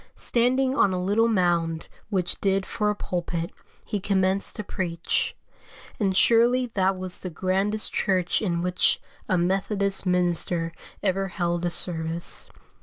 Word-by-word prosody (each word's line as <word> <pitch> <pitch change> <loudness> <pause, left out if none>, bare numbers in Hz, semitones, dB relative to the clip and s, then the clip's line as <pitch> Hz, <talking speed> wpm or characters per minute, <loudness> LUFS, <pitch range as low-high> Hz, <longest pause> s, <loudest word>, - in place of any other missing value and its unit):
Standing 255 +2 +1
on 200 -8 +3
a 180 - -1
little 205 +5 +2
mound 170 -6 +1 0.2
which 185 -4 -1
did 195 -1 +1
for 210 -1 -1
a 210 - 0
pulpit, 170 -3 -3 0.3
he 205 - -2
commenced 190 0 +1
to 210 - -4
preach; 170 -3 -2 0.6
and 195 -3 +1
surely 240 +3 +4
that 190 -1 +1
was 185 -1 -4
the 185 - -5
grandest 190 +5 0
church 185 -3 +1
in 170 -5 -1
which 180 0 +2 0.3
a 185 - +3
Methodist 195 +2 0
minister 175 -1 +1 0.3
ever 195 0 +1
held 175 -1 -1
a - - +2
service. 165 -1 0
185 Hz, 140 wpm, -25 LUFS, 175-205 Hz, 0.6 s, surely